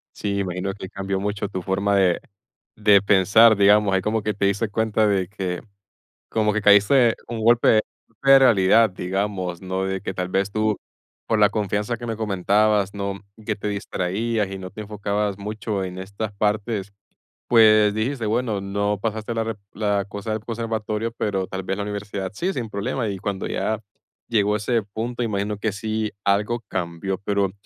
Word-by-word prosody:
Sí, 100 -1 -2
imagino 95 0 -2
que 95 -2 -8
cambió 95 0 -3
mucho 105 0 -2
tu 95 -2 -5
forma 100 +2 +1
de 90 -3 +3 0.6
de 105 -2 +5
pensar, 100 +3 +6
digamos, 100 0 +4
ahí 95 - +2
como 110 +2 -1
que 105 - -1
te 100 0 -1
diste 100 +3 0
cuenta 110 +1 +1
de 100 -3 +1
que, 95 -3 -4 0.7
como 105 -1 +1
que 110 - 0
caíste 105 +4 +5
un 115 -1 -4
golpe 120 +1 +4 0.4
un 115 - -33
golpe 135 +5 0
de 135 - +10
realidad, 115 -3 +5
digamos, 95 -1 -3
¿no? 95 0 -2
De 95 -1 -3
que - - -3
tal 90 -1 -3
vez 95 +1 0
tú, 110 -1 +1 0.5
por 110 - +1
la 105 -1 +6
confianza 105 +2 -1
que 120 - -9
me 115 -2 -3
comentabas, 105 0 +2
¿no?, 100 -1 -4 0.3
que 110 - -1
te 105 - -4
distraías 100 +2 -2
y 95 - -5
no 95 -1 -7
te 105 +3 -8
enfocabas 105 -1 -2
mucho 105 0 -3
en 90 -1 -5
estas 100 +3 -5
partes, 105 -1 -1 0.6
pues 110 -3 +6
dijiste, 115 +3 -2
bueno, 110 -2 0
no 100 +1 -1
pasaste 110 +1 -3
la 115 - 0
re 115 -1 -3 0.2
la 105 -1 0
cosa 100 +2 -6
del 110 - -1
conservatorio, 110 0 -3
pero 100 -4 -2
tal 95 +1 -5
vez 95 +1 -3
la 105 - -2
universidad 100 -2 -4
sí, 180 - -1
sin 125 -10 -4
problema. 105 +4 -2
Y 100 - -4
cuando 100 0 -3
ya 110 +1 -1 0.5
llegó 105 -2 +2
ese 115 +2 0
punto, 115 +4 -5
imagino 105 -2 -1
que 110 +1 -1
sí 110 +1 -2
algo 105 +4 +1
cambió, 90 +1 -3
pero 100 -1 0
105 Hz, 180 wpm, -23 LUFS, 100-110 Hz, 0.7 s, de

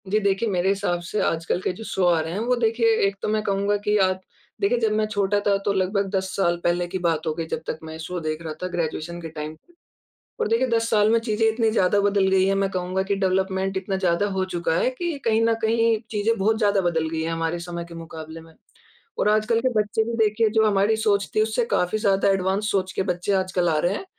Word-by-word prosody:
जी, 210 +3 +2
देखिए 200 +2 0
मेरे 185 -1 +1
हिसाब 195 -3 0
से 210 - -2
आजकल 165 +2 0
के - - -1
जो - - -6
शो 190 -4 -1
आ 175 -2 +4
रहे 160 +1 -3
हैं, 195 - -2
वो 245 +3 +1
देखिए 230 -1 +2
एक 195 - -3
तो - - -2
मैं 215 0 +1
कहूँगा 200 0 0
कि 210 +1 0
आप 185 -1 +1 0.4
देखिए, 400 -11 +2
जब 220 -2 +1
मैं 215 0 +1
छोटा 205 -1 0
था 200 -1 +4
तो 200 - +2
लगभग 195 +1 0
10 190 0 -1
साल 175 -3 +1
पहले 175 0 +1
की 180 - -4
बात 165 -2 -1
हो 155 - +1
गई 165 +1 -4
जब - - -3
तक 160 - -3
मैं 160 0 -8
शो 175 +3 -5
देख 155 -1 -3
रहा 160 -2 -5
था - - 0
ग्रेजुएशन 170 -1 -3
के 165 - -6
टाइम। 155 0 -6 0.9
और - - +1
देखिए 230 +4 +2
10 230 -1 +1
साल 210 -1 +4
में 230 - +4
चीज़ें 225 -1 0
इतनी 225 0 +1
ज़्यादा 200 -2 +2
बदल 200 -1 +2
गई 190 0 +3
हैं 195 - +2
मैं 195 0 +1
कहूँगा 185 0 -1
कि 195 +1 -1
डेवलपमेंट 190 0 0
इतना 190 +1 -2
ज़्यादा 185 +1 +1
हो 190 -1 -1
चुका 170 -1 0
है - - +2
कि 330 +5 -3
कहीं 225 0 +2
न 230 0 +3
कहीं 230 0 +2
चीज़ें 220 +1 0
बहुत 220 +3 +2
ज़्यादा 205 -2 +2
बदल 165 -3 0
गई 160 0 -2
हैं 165 - -2
हमारे 165 +1 -2
समय 170 0 -5
के 170 - -11
मुकाबले 160 -1 -8
में। 165 0 -17 0.6
और - - +2
आजकल 215 +2 +2
के 255 - +1
बच्चे 210 +1 0
भी 235 - -4
देखिए 220 +1 +3
जो 220 0 +3
हमारी 205 +1 +2
सोच 205 -2 +1
थी 215 - +5
उससे 220 +2 0
काफ़ी 180 +4 +1
ज़्यादा 200 -2 +2
एडवांस 195 +2 0
सोच 190 -1 0
के - - -1
बच्चे 180 +3 -3
आजकल 185 -2 0
आ 155 -2 +2
रहे 175 +5 +1
हैं - - -5
195 Hz, 250 wpm, -23 LUFS, 175-215 Hz, 0.9 s, थी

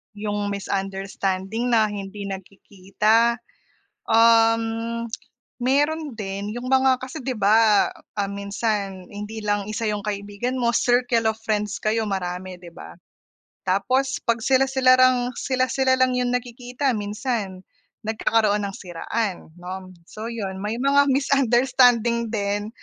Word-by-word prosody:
'Yong 205 0 -3
misunderstanding 195 +2 -3
na 215 -2 +4
hindi 200 0 -6
nagkikita, 200 +4 0 0.7
um, 225 0 +5 1.0
mayro'n 290 +2 0
din 200 0 -5
'yong 245 +1 -5
mga 260 -1 +3
kasi, 260 - -6
'di 255 -1 -3
ba, 215 +1 +4
ah, 200 -1 -5
minsan 200 -1 -3
hindi 210 +1 -7
lang 205 -1 -1
isa 215 +1 -2
'yong 210 0 -3
kaibigan 205 +4 -3
mo, 240 -2 +1
circle 245 -2 +2
of 220 0 -1
friends 210 -1 -1
kayo 220 0 0
marami, 185 -1 -4
'di 170 -1 -11
ba. 85 - -11 0.7
Tapos 255 +9 0
'pag 235 -1 +2
sila-sila 265 -1 +4
lang 250 -1 +4
sila-sila 260 0 +1
lang 255 0 +3
'yong 245 0 0
nakikita 250 +2 -2
minsan 205 -2 -3 0.4
nagkakaroon 215 -1 +1
ng 195 -1 -5
siraan, 185 +2 -4
'no. 185 +1 -7 0.2
So 220 +2 -7
'yon, 195 -5 -5
may 210 +3 -3
mga 280 +1 +4
misunderstanding 245 -3 +3
din. 205 0 -1
220 Hz, 125 wpm, -23 LUFS, 200-245 Hz, 1.0 s, um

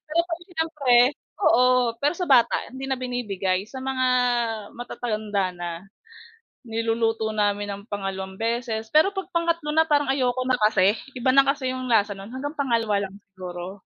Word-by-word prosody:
Pero 320 +2 +1
kasi 345 0 -5
siyempre 310 -6 +1 0.5
oo 250 -3 +4
pero 290 +6 +1
sa 360 - -5
bata 265 -9 +4 0.2
hindi 265 +1 -6
na 270 - 0
binibigay 205 -7 -2
sa 260 +2 -8
mga 260 -1 0 0.7
matatanda 215 -5 -2
na. 175 -1 -6 0.9
Niluluto 225 -1 0
namin 205 -1 0
ng 200 - -11
pangalawang 190 -1 -4
beses 225 -1 -2
pero 310 - +4
'pag 385 -3 -5
pangatlo 335 0 +1 0.2
na 320 - +6
parang 295 -3 +1
ayoko 255 -1 0
na 255 - +3
kasi, 205 -1 +4 0.2
iba 260 0 +1
na 275 - +8
kasi 270 -2 -1
yung 255 -1 -4
lasa 205 -2 +3
nun, 195 +4 -10
hanggang 290 +4 -5
pangalawa 235 -5 0 0.2
lang 195 - -6 0.2
siguro. 180 +1 -7
245 Hz, 160 wpm, -24 LUFS, 205-270 Hz, 0.9 s, na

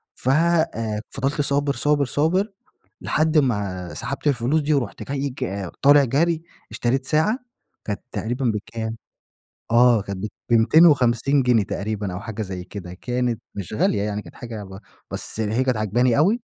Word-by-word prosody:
فَ 130 - -2
آآ 135 -9 +1
فضلت 135 +2 -1
صابر 140 0 +1
صابر 145 0 +1
صابر 175 - +1 0.5
لحد 155 +1 +1
ما 100 - 0
سحبت 140 +2 -4
الفلوس 140 +3 +2
دي 150 +1 +1
ورُحت 140 -4 -2
جاي 140 0 -1
ك 100 -7 -4
طالع 145 0 +7
جري 160 +6 +1 0.3
اشتريت 130 +3 0
ساعة 160 - +2 0.5
كانت 105 -2 -3
تقريبًا 125 +4 -2
بكام 110 0 -3 0.7
آه 120 -1 +5
كانت 100 0 -5 0.2
ب250 130 +1 +4
جنيه 120 -4 +3
تقريبًا 100 -1 -3
أو 90 - -4
حاجة 110 +1 -6
زي 95 -3 -5
كده 90 -2 -8
كانت 125 +4 -2
مش 100 -2 -6
غالية 105 -1 +1
يعني 105 0 -2
كانت - - -14
حاجة 115 -4 -7
ب 95 0 -10 0.3
بس - - -5
هي 110 +3 +1
كانت 130 -3 0
عاجباني 115 +3 +2
أوي. 200 +11 +3
120 Hz, 150 wpm, -23 LUFS, 105-145 Hz, 0.7 s, طالع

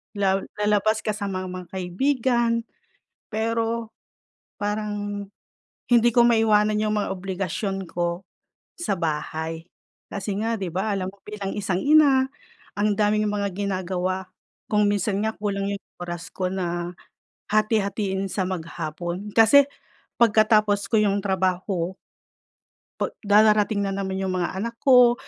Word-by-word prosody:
la 195 -1 +2 0.2
lalabas 210 +1 +2
kasama 200 -3 -2
ang 185 - -6
mga 180 - -10
kaibigan 235 +6 +1 0.8
pero 225 +1 -1 0.7
parang 205 -1 -3 0.6
hindi 240 -1 +5
ko 240 - +5
maiwanan 215 -2 +3
yung 215 0 0
mga - - -2
obligasyon 195 0 -3
ko 175 +1 -2 0.6
sa 200 - -1
bahay 160 0 -3 0.4
kasi 200 0 -3
nga, 225 0 0
'di 190 -3 -3
ba, 195 +4 -1
alam 185 -1 -2
mo, 200 - -21
bilang 205 -2 -5
isang 195 -3 -1
ina, 285 -3 +5 0.5
ang 205 0 +2
daming 210 0 +2
mga 205 -1 -1
ginagawa. 185 -1 -2 0.5
Kung 210 -1 +4
minsan 205 0 0
nga 220 - 0
kulang 200 -1 -2
yung 200 - -6 0.2
oras 175 -1 -5
ko 185 -1 -1
na 175 -1 -3 0.6
hati-hatiin 205 -2 +1
sa 190 -1 0
maghapon 175 +2 -4
kasi 250 +5 +7 0.5
pagkatapos 215 -2 +4
ko 225 - +3
yung 205 -1 +2
trabaho, 185 -1 0 1.0
pa - - -1
darating 210 0 +4
na 195 - -1
naman 190 -1 -2
'yong 190 -1 -1
mga 185 +1 -2
anak 230 +4 -3
ko, 250 -3 +7
205 Hz, 130 wpm, -24 LUFS, 185-215 Hz, 1.0 s, kasi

